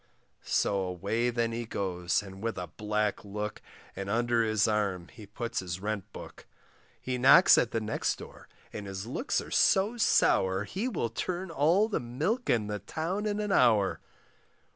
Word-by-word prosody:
So 100 - +1
away 100 +6 -1
then 115 -1 -1
he 115 +1 -4
goes, 90 -3 -1
and 95 -1 -11
with 115 -1 -3
a 90 - -3
black 105 +4 -2
look, 105 +1 -5 0.3
And 100 0 -5
under 120 +2 +1
his 110 -1 +2
arm 100 -5 -1
he 105 -3 -13
puts 115 +3 -4
his 90 -1 -5
rent 105 -1 -4
book; - - -11 0.5
He 125 -1 -3
knocks 130 +2 +8
at 120 - +2
the 115 - -1
next 110 0 -1
door, - - -12 0.3
and 105 -1 -6
his 95 +1 -5
looks 135 - -1
are - - -11
so 205 +4 +3
sour, 95 - +3
He 195 - -3
will 160 - -2
turn 185 0 -4
all 165 +8 +3
the 220 - -1
milk 155 - -2
in 110 -3 +2
the 105 0 -4
town 185 - -3
in 205 0 -1
an 210 -1 -2
hour. 110 - +3
110 Hz, 175 wpm, -29 LUFS, 100-135 Hz, 0.5 s, knocks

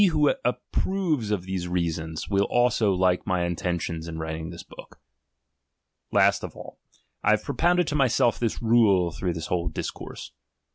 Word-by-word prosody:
He 205 - +7
who 150 -4 +3
approves 145 - -1
of 105 -4 -1
these 95 -1 -3
reasons, 80 -2 -2
will 100 0 +2
also 120 -4 +2
like 90 0 +1
my 90 -3 +1
intentious 85 -1 -3
iu 80 -1 -6
writing 80 0 -4
this 85 -1 -9
book. - - -14 1.1
Last - - +3
of - - -7
all, - - -11 0.4
I - - +3
have - - 0
propounded 175 +1 +2
to 150 - -2
myself 130 -3 +2
this 115 -1 -2
rule 105 -7 +4
through 90 +1 -2
this 80 -1 -5
whole 85 0 -1
discourse. 80 - -6
95 Hz, 160 wpm, -26 LUFS, 85-120 Hz, 1.1 s, He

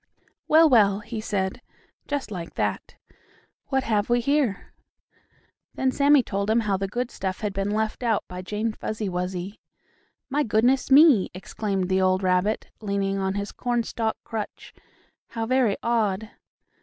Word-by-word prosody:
"Well, 320 +1 +6
well," 210 -7 +4
he 220 +1 -6
said, 195 +1 -2 0.5
just 285 -6 -3
like 175 -4 -6
that. - - -2 0.7
"What 265 -1 0
have 210 -1 0
we 240 0 +3
here?" 265 -5 0 1.0
Then 265 -1 +1
Sammie 285 0 +4
told 200 -1 -2
him 225 +2 +3
how 205 -3 0
the 195 +1 -2
good 240 +5 -3
stuff 185 -1 -4
had 210 -2 -2
been 195 +1 -2
left 220 +2 -1
out 230 -4 +1
by 180 0 -7
Jane 215 +4 -2
Fuzzy 215 -1 -4
Wuzzy. 180 +2 -4 0.7
"My 285 +2 0
goodness 250 +2 +2
me!" 275 - +6
exclaimed 195 0 -3
the 190 0 +1
old 185 +1 +2
rabbit, 185 +4 0
leaning 200 -1 -1
on 190 0 -1
his 200 0 -3
cornstalk 235 -2 -2
crutch, 220 -2 -6 0.5
"how 225 -1 -4
very 245 -4 +2
odd." 220 -3 0
215 Hz, 150 wpm, -25 LUFS, 195-240 Hz, 1.0 s, Well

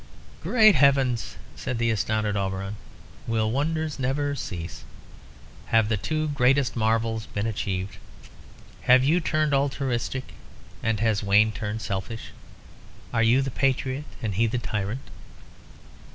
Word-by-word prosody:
"Great 220 -4 +6
Heavens!" 135 - +2 0.2
said 125 - -4
the 115 0 +1
astounded 110 0 0
Auberon. 95 0 -2 0.5
"Will 110 -1 +1
wonders 155 +3 -1
never 140 +3 0
cease? 85 -11 -6 0.8
Have 115 -2 +3
the 115 - +2
two 155 +8 -1
greatest 135 -1 +2
marvels 115 0 0
been 100 +1 -3
achieved? 100 -3 -3 0.9
Have 130 +1 +7
you 155 +6 +3
turned 155 -2 0
altruistic, 135 -2 -1 0.5
and 110 -2 0
has 110 -3 +2
Wayne 105 +2 +4
turned 110 +1 -4
selfish? 100 +4 -4 0.8
Are 115 - +2
you 120 +4 +4
the 135 - -3
patriot, 135 +2 0 0.2
and 105 -3 -1
he 115 +5 +2
the 115 - -1
tyrant?" 110 +2 -3
115 Hz, 125 wpm, -25 LUFS, 110-135 Hz, 0.9 s, Have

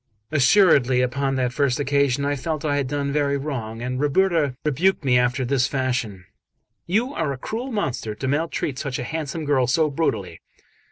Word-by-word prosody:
Assuredly, 135 -4 +4
upon 135 +2 0
that 125 -1 0
first 140 -2 +1
occasion, 140 -1 +1
I 145 0 0
felt 155 +3 -4
I 145 -1 +1
had 140 -2 -1
done 140 0 -2
very 140 -1 +1
wrong, 120 -6 -5
and 125 +1 -3
Ruberta 150 -1 +2
rebuked 155 +3 +1
me 125 -2 +3
after 125 +1 0
this 130 0 +1
fashion: 125 -8 -2 0.6
"You 230 +10 0
are 155 -4 -1
a 135 - -4
cruel 235 - -5
monster 130 - -2
to 130 - -4
maltreat 145 -1 -1
such 135 -3 -3
a - - -4
handsome 155 +3 -4
girl 135 -4 +2
so 155 +4 +2
brutally." 100 - -2
140 Hz, 175 wpm, -23 LUFS, 125-155 Hz, 0.6 s, Assuredly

